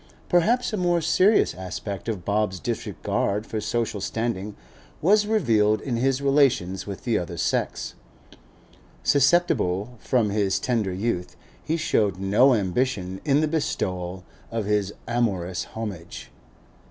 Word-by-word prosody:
Perhaps 225 +8 +2
a - - 0
more 175 -2 +2
serious 185 +6 +3
aspect 95 +4 -5
of 95 -6 -4
Bob's 105 -2 0
disregard 100 +6 -2
for 110 -1 -4
social 110 -2 -2
standing 105 -1 -3 0.4
was 205 +5 +4
revealed 110 - +3
in 130 -4 -3
his 135 +2 +1
relations 130 -11 +2
with 100 -2 -6
the 115 -3 +1
other 85 -1 -6
sex. - - -1 1.1
Susceptible 125 - +2
from 115 -4 +1
his 100 -2 +1
tender 115 -6 0
youth, 90 -1 -2 0.3
he 160 - -1
showed 105 - +1
no 105 +8 +4
ambition 95 -2 -1
in 145 0 +3
the 155 - +2
bestowal 90 - -2 0.3
of 115 -2 -2
his 105 -1 0 0.2
amorous 100 -7 -1
homage. 100 -7 -7
110 Hz, 130 wpm, -25 LUFS, 95-135 Hz, 1.1 s, was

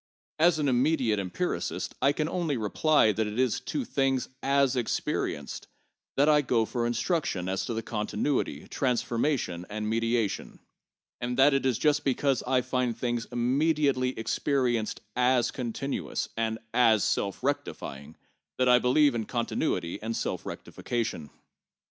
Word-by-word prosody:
As 165 0 +5
an 150 -2 0
immediate 125 -4 +2
empiricist, 100 - -3
I 140 - +5
can 150 +1 -1
only 165 -5 -1
reply 110 +3 +3
that 105 +1 -1
it 105 +2 -5
is 130 -2 +2
to 280 -4 -3
things 135 - 0
as 140 -1 +2
experienced 125 -2 -2 0.5
that 140 +2 +4
I 150 -1 +5
go 120 -4 +1
for 120 +1 -1
instruction 120 - -1
as 95 0 -2
to 115 -2 -2
continuity, 110 +6 -2
transformation 120 - -1
and 105 +1 -3
mediation; 115 -1 -1 0.6
and 120 0 -3
that 135 +2 +6
it 135 -1 +2
is 125 -4 +1
just 150 -1 +2
because 135 0 +1
I 130 0 +3
find 125 -2 -1
things 120 -1 -1
immediately 130 +1 +1
experienced 120 -1 0
as 125 0 +3
continuous, 130 +2 -3
and 110 -1 -1 0.2
as 115 -4 +4
self 100 +4 -1
rectifying 80 - -4 0.4
that 130 - +2
I 125 0 +6
believe 140 +3 +4
in 115 -2 -2
continuity 115 - -2
and 115 +1 -3
self - - -3
rectification. 115 -11 -4
125 Hz, 140 wpm, -28 LUFS, 115-140 Hz, 0.6 s, that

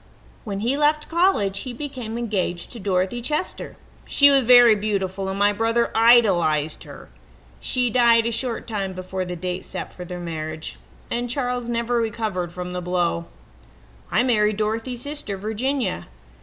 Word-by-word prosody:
"When 200 -2 -4
he 240 +5 +1
left 300 +1 +1
college 325 - +2
he 255 - -5
became 245 -4 -6
engaged 195 -7 -2
to 235 - -6
Dorothy 190 +4 -1
Chester. 300 +8 -3 0.3
She 285 0 +5
was 270 -3 +3
very 245 -1 +8
beautiful, 195 -2 -2
and 190 - -3
my 205 +1 +3
brother 230 +2 +1
idolized 185 -10 +4
her. - - -12 0.5
She 245 - 0
died 235 -2 +4
a 235 - 0
short 230 0 -3
time 200 -4 -3
before 185 0 -4
the 180 0 -5
date 180 +2 -4
set - - -7
for 180 - -8
their 180 0 -7
marriage, 155 -2 -5 0.3
and 240 +1 -2
Charles 245 -2 -2
never 235 +1 0
recovered 215 -6 -2
from 180 0 -6
the 180 - -3
blow. 175 -1 -1 0.8
"I - - +2
married 215 -4 +2
Dorothy's 225 +3 -2
sister, 285 -9 -5
Virginia. 220 +2 -2
220 Hz, 155 wpm, -23 LUFS, 185-245 Hz, 0.8 s, very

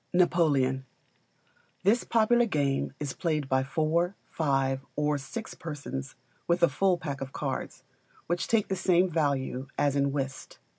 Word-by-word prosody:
Napoleon. 150 -7 +3 1.0
This 215 +6 +3
popular 235 +1 +3
game 140 -7 0
is 145 -3 -3
played 155 -5 -1
by 130 0 +2
four, 165 +6 0 0.2
five, 135 -3 0
or 150 -1 +1
six 135 +12 -6
persons 140 -4 -6 0.3
with 175 0 +2
a 170 - +7
full 180 +5 +2
pack 140 -5 -5
of 135 0 -5
cards, - - -4 0.4
which 175 +1 -1
take 225 -3 +2
the 190 - -1
same 180 0 +3
value 140 -4 0
as 145 -1 +2
in 140 0 +2
Whist. 135 -1 -4
150 Hz, 145 wpm, -28 LUFS, 135-175 Hz, 1.0 s, a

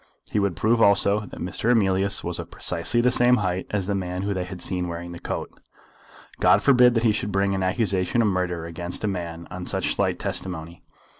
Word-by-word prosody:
He 105 - +1
would 100 -4 0
prove 115 +6 +2
also 100 0 +4
that - - -10
Mr. 90 +6 -2
Emilius 100 -3 +2
was - - -3
of - - -6
precisely 120 - 0
the 125 +1 +3
same 125 0 +4
height 95 -2 -2
as 100 -3 -1
the 100 - -1
man 90 -1 -3
whom 100 0 -1
they 90 -2 -3
had 90 0 -8
seen 90 0 -2
wearing 85 0 -6
the 85 - -8
coat. - - -4 0.9
God - - +4
forbid 125 -3 +5
that 115 - +1
he 115 - +4
should 105 0 -2
bring 100 +1 +1
an 95 - -1
accusation 95 +2 +1
of - - +2
murder 90 -3 -1
against 85 +3 -4
a - - +1
man 85 -3 -5
on 90 0 -6
such - - 0
slight - - 0
testimony. 85 -2 -5
95 Hz, 215 wpm, -24 LUFS, 90-105 Hz, 0.9 s, forbid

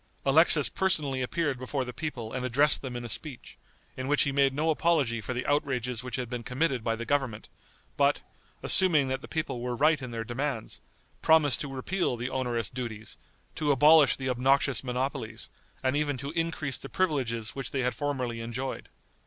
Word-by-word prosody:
Alexis 150 +1 +6
personally 150 -9 0
appeared 140 0 -1
before 130 +1 -2
the 125 - -7
people 125 -8 -5
and 130 -1 -3
addressed 135 +4 +3
them 130 -3 -6
in 120 0 -5
a - - -4
speech, 130 +3 -6 0.4
in 130 0 -4
which 145 +1 +4
he 140 - 0
made 135 0 +3
no 155 +4 +1
apology 145 -8 +1
for 120 - -5
the 125 - -3
outrages 125 -5 0
which 125 -2 -5
had 125 -1 -3
been 120 0 -4
committed 130 0 -1
by 115 0 0
the 115 +1 -6
government, 130 -5 -1 0.5
but, - - +3 0.4
assuming 155 -8 +4
that 130 0 -2
the - - -10
people 155 -6 -3
were 125 0 -2
right 150 +2 +3
in 130 - -5
their 115 -1 -4
demands, 120 0 -4 0.4
promised 155 -5 +4
to 140 - -4
repeal 135 +1 -1
the 125 +3 -4
onerous 120 -4 -1
duties, 115 -4 -6 0.3
to 150 -2 0
abolish 150 +1 +6
the 130 - -5
obnoxious 130 +1 +2
monopolies, 125 -3 -4 0.3
and 130 +1 +1
even 145 -2 0
to 140 +3 -5
increase 165 -5 -1
the 135 - -9
privileges 125 - -1
which 135 -2 -5
they 135 - -1
had 125 0 0
formerly 130 -5 -3
enjoyed. 125 +3 -5
130 Hz, 185 wpm, -28 LUFS, 120-145 Hz, 0.5 s, Alexis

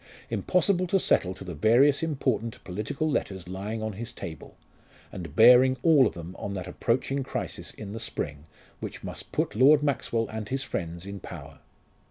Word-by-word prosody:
Impossible 185 0 +2
to 195 +2 +2
settle 95 - +2
to 95 - -9
the 90 -2 -6
various 120 - +4
important 135 -7 -1
political 105 +11 -3
letters 95 - -2
lying 100 +4 -4
on 110 -1 -3
his 115 +4 -6
table, 80 -2 -9 0.5
and 85 -3 -8
bearing 125 +3 +7
all 150 -7 +6
of - - -6
them 85 +1 -8
on 100 - -4
that 90 -3 -4
approaching 125 +8 -1
crisis 130 - -5
in 100 -2 -8
the 110 - -5
spring 75 -7 -4 0.3
which - - -7
must - - -6
put - - -1
Lord 145 +5 +6
Maxwell 120 -5 0
and 110 -1 -5
his 135 0 -1
friends 85 -6 -5
in 100 0 -6
power. - - -10
110 Hz, 175 wpm, -27 LUFS, 95-135 Hz, 0.5 s, bearing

